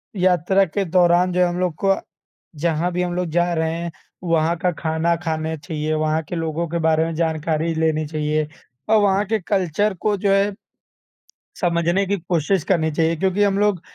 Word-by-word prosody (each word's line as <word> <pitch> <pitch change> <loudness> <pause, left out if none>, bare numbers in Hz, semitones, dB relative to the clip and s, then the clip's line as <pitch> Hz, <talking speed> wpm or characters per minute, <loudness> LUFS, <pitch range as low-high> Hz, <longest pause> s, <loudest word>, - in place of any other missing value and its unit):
यात्रा 185 +1 +3
के 195 +3 -2
दौरान, 180 +1 +3
जो 180 - 0
है, 180 - +4
हम 175 +1 -3
लोग 180 -3 0
को 195 0 +4 0.7
जहाँ 170 +1 0
भी 180 - 0
हम 175 -1 -2
लोग 180 0 -1
जा 175 +1 +1
रहे 160 -1 0
हैं, 170 0 -4 0.3
वहाँ 165 0 +1
का 180 +1 0
खाना 160 +1 0
खाने 160 0 -2
चाहिए, 155 0 -3
वहाँ 155 +1 0
के 175 - -3
लोगों 165 +1 -2
के 170 0 -2
बारे 160 0 +3
में 165 - -4
जानकारी 160 0 -1
लेनी 160 -1 +1
चाहिए, 150 0 -1 0.4
और 220 -1 +5
वहाँ 200 0 +2
के 220 +2 0
कल्चर 190 +1 0
को, 210 -1 +1
जो 195 +1 +1
है, 200 +1 +2 1.1
समझने 170 +2 +1
की 200 0 0
कोशिश 170 +1 0
करनी 160 -4 +1
चाहिए। 165 +2 +1
क्योंकि 190 +4 +1
हम 200 -1 +2
लोग 205 -4 +1
170 Hz, 190 wpm, -21 LUFS, 160-185 Hz, 1.1 s, और